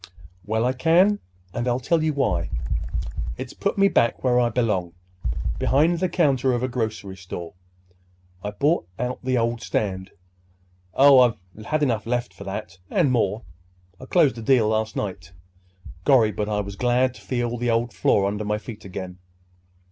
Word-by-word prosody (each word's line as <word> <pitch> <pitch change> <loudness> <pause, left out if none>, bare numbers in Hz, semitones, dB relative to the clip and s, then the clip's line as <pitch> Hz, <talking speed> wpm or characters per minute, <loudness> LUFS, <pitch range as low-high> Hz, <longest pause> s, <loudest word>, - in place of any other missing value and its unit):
"Well, 110 +2 +1
I 125 - +2
can; 175 +9 +4 0.3
and 120 - -2
I'll 120 0 +1
tell 160 +6 +1
you 155 0 +1
why. 135 - 0 0.9
It's 130 -1 -6
put 200 - -2
me 200 0 +5
back 120 -11 +1
where 125 -1 +3
I 120 -1 +3
belong—behind 105 - -1
the 185 0 0
counter 135 -7 +2
of 120 0 -1
a - - +1
grocery 110 -5 -3
store. 90 -2 -8 0.9
I've 105 0 -5
bought 145 - +2
out 125 +1 -3
the 130 0 +1
old 115 0 0
stand. 95 -2 -2 0.9
Oh, 140 -1 +7
I 110 -5 0
had 155 -1 +1
enough 115 -5 0
left 120 0 -1
for - - -11
that, 95 - -6
and 135 - +2
more! 110 -2 0 0.7
Closed 145 -9 +3
the - - -6
deal 115 -2 +3
last 110 0 -1
night. 90 -3 -5 0.7
Gorry, 115 -4 +5
but 105 +2 -3
I 105 -1 0
was 100 0 -7
glad 125 +2 +2
to - - -14
feel 120 -2 -2
the 120 0 -1
old 115 0 0
floor 95 +1 +2
under 105 +2 -2
my 105 0 -1
feet 110 0 -9
again!" 95 -1 -7
120 Hz, 165 wpm, -24 LUFS, 105-130 Hz, 0.9 s, Oh